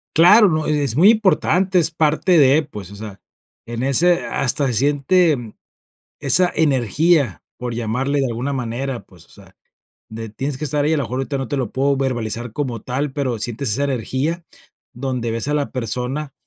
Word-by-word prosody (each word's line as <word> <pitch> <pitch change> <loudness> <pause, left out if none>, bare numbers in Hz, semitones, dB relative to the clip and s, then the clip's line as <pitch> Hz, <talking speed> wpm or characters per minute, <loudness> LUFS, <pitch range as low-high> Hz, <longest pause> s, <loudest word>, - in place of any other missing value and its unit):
Claro, 200 +6 +7
¿no? 155 -2 -1
E-es 145 -6 0
muy 180 +9 +6
importante, 190 -3 +2
es 165 -1 +2
parte 160 +3 +2
de, 145 +2 +5
pues, 105 -10 -10
o - - -10
sea, 100 -2 -9 0.5
en 120 +1 -4
ese, 170 +6 +2
hasta 140 +2 0
se 125 - -1
siente, 145 - +1 0.7
esa 180 0 +4
energía, 145 - +1
por 125 -1 -5
llamarle 125 +5 -1
de 135 - +1
alguna 125 +4 -3
manera, 130 0 -4
pues, 85 -4 -19
o - - -34
sea, - - -18 0.5
de 115 0 -7
tienes 135 +5 -4
que 150 - -5
estar 145 -1 -1
ahí, 155 +2 +2
a - - +1
lo 145 - -1
mejor 125 +3 -4
ahorita 140 +1 -3
no 135 -3 -4
te 145 - -2
lo 125 -5 -3
puedo 140 +1 0
verbalizar 120 -3 -3
como 125 -4 -3
tal, 135 +4 -3
pero 130 -5 -2
sientes 120 +3 -3
esa 140 +7 0
energía, 140 - -2 0.5
donde 125 -2 -3
ves 115 +4 -3
a 150 - 0
la 145 -1 -1
persona. 125 +4 -3
135 Hz, 185 wpm, -20 LUFS, 120-150 Hz, 0.7 s, Claro